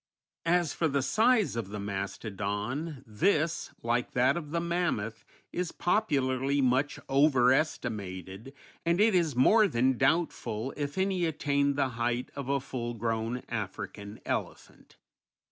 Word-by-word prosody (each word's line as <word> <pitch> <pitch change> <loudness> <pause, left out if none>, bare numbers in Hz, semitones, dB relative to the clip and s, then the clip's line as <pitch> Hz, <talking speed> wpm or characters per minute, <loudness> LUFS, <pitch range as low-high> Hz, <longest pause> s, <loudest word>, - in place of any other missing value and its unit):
_] - - +3
As 175 -3 +2
for 165 - +1
the 140 -2 0
size 220 - +3
of 115 -4 -3
the 105 0 -5
mastodon, 105 - -4
this, 155 - +1
like 120 +1 0
that 125 +4 +3
of 160 -4 -5
the 170 +2 -1
mammoth, 170 -11 -1 0.3
is 180 -1 -2
popularly 140 - +1
much 135 +2 +1
over 135 -2 +4
estimated, 105 - -3 0.3
and 170 +2 +1
it 215 0 +5
is 165 -7 +2
more 210 - +5
than 130 -4 +1
doubtful 135 -6 0
if 145 +1 -4
any 190 -2 +1
attained 140 -3 +1
the 135 -2 +1
height 120 +1 -2
of 140 -2 -5
a 140 0 +2
full 120 -3 -5
grown 115 +2 -2
African 105 -1 -5
elephant. - - -5
135 Hz, 140 wpm, -29 LUFS, 115-165 Hz, 0.3 s, it